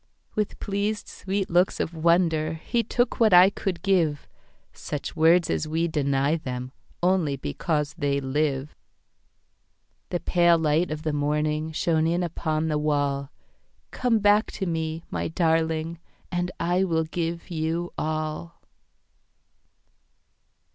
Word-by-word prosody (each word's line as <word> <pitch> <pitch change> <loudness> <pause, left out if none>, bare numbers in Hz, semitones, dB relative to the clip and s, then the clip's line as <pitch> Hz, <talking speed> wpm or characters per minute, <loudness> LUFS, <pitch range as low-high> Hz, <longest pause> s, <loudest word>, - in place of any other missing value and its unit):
With 210 -1 -2
pleased 205 +1 -2
sweet 195 0 -3
looks 180 +2 +2
of - - -1
wonderHe 165 +5 +1
took 245 0 0
what 220 -4 +5
I 185 +2 +8
could 190 -3 -4
give,—Such 155 -4 -3
words 165 +2 +4
as 155 - -1
we 165 +2 0
deny 140 -1 +1
themOnly 140 +4 -2
because 150 -1 -2
they 140 -4 0
live. 140 +1 -1 1.3
The 175 - -1
pale 175 -1 +4
light 160 +2 +1
of 155 0 -5
the 155 - 0
morningShone 155 +2 0
in 175 +1 0
upon 160 -2 -1
the 150 -1 0
wall. 145 -2 0 0.6
Come 245 -3 +1
back 205 +1 +3
to 190 - -3
me, 165 -1 -2
my - - -2
darling, 160 0 0 0.3
And 175 0 -1
I 175 +2 +1
will 165 -3 +1
give 170 +2 -4
you 165 +1 -2
all. 155 +2 -3
160 Hz, 120 wpm, -25 LUFS, 155-175 Hz, 1.3 s, I